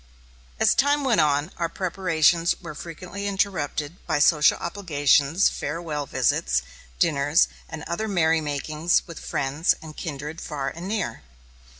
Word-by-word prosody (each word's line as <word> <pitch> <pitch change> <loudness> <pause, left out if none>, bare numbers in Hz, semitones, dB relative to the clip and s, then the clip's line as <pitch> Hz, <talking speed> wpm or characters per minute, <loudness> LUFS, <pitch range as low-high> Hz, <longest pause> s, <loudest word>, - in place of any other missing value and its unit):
As - - +5
time 285 +1 +2
went 255 -5 +3
on, 150 +2 +1
our 170 -1 -1
preparations 170 -2 +1
were 170 -4 -8
frequently 180 +6 -7
interrupted 180 -5 -2
by - - +1
social 150 +1 +5
obligations, 160 -2 +2
farewell 150 -2 -3
visits, - - +1 0.3
dinners, 145 -1 +3 0.2
and 160 -1 -7
other 215 +6 -3
merrymakings 160 -2 +1
with 170 - -9
friends 140 +5 0
and 155 -1 -11
kindred 150 0 -6
far 140 -3 -3
and 170 +3 -7
near. 195 - -3
160 Hz, 125 wpm, -24 LUFS, 145-180 Hz, 0.3 s, As